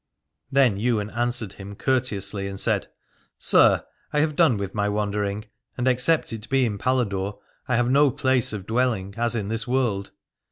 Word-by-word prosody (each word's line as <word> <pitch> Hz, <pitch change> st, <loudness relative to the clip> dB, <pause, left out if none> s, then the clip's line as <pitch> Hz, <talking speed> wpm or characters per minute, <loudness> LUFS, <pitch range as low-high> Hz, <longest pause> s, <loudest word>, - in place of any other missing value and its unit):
Then 130 Hz, -7 st, +3 dB
Ywain 110 Hz, -2 st, 0 dB
answered 120 Hz, -2 st, -1 dB
him 100 Hz, +1 st, -9 dB
courteously 100 Hz, -6 st, -1 dB
and 95 Hz, 0 st, -6 dB
said: -, -, 0 dB, 0.5 s
Sir, -, -, +4 dB, 0.3 s
I 150 Hz, -, +2 dB
have 155 Hz, -1 st, 0 dB
done 155 Hz, -10 st, +4 dB
with 100 Hz, -1 st, -4 dB
my 105 Hz, -1 st, 0 dB
wandering, 105 Hz, 0 st, -2 dB, 0.3 s
and 125 Hz, 0 st, 0 dB
except 130 Hz, +2 st, +2 dB
it 110 Hz, 0 st, -7 dB
be 135 Hz, -1 st, +3 dB
in 105 Hz, -3 st, -3 dB
Paladore 100 Hz, -6 st, -1 dB, 0.3 s
I 125 Hz, -, +1 dB
have 120 Hz, +1 st, +2 dB
no 145 Hz, +1 st, +5 dB
place 130 Hz, -1 st, +2 dB
of 105 Hz, -3 st, -5 dB
dwelling, 115 Hz, -5 st, 0 dB
as 120 Hz, +1 st, 0 dB
in 105 Hz, -3 st, -2 dB
this 115 Hz, +2 st, -1 dB
world. 120 Hz, -7 st, 0 dB
115 Hz, 170 wpm, -24 LUFS, 100-130 Hz, 0.5 s, no